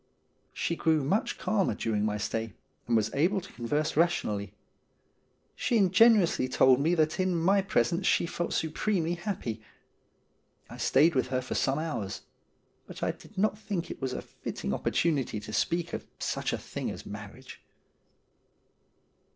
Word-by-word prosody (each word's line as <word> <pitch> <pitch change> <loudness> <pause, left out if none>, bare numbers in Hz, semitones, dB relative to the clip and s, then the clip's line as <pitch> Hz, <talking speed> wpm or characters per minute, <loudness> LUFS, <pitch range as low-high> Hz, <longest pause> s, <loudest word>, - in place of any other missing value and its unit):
She 170 - -2
grew 160 -3 +2
much 190 +11 0
calmer 195 - +1
during 105 -1 -1
my 105 0 0
stay, 110 +1 -3 0.3
and 120 -1 +3
was 110 0 0
able 175 +8 +2
to 190 - -12
converse 145 +6 -1
rationally. 105 - +1 1.0
She 235 - +1
ingenuously 195 - +5
told 130 0 +5
me 165 +4 +2
that 155 0 +1
in 185 -1 +1
my 190 +4 +3
presence 175 - +1
she - - +3
felt 170 0 -3
supremely 165 +1 0
happy. 175 - -4 1.1
I - - -8
stayed 155 +6 +4
with 130 - +1
her 130 0 0
for 125 - -5
some 135 +1 +1
hours; 150 -12 -4 0.6
but - - -8
I - - +2
did 210 - -17
not 210 +1 +1
think 200 -5 -3
it - - -8
was 130 -1 -2
a - - -4
fitting 65 - -5
opportunity 135 - 0
to 110 - -9
speak 170 +10 0
of - - -5
such - - -2
a - - -1
thing - - -5
as - - -7
marriage. - - -9
160 Hz, 155 wpm, -29 LUFS, 125-185 Hz, 1.1 s, ingenuously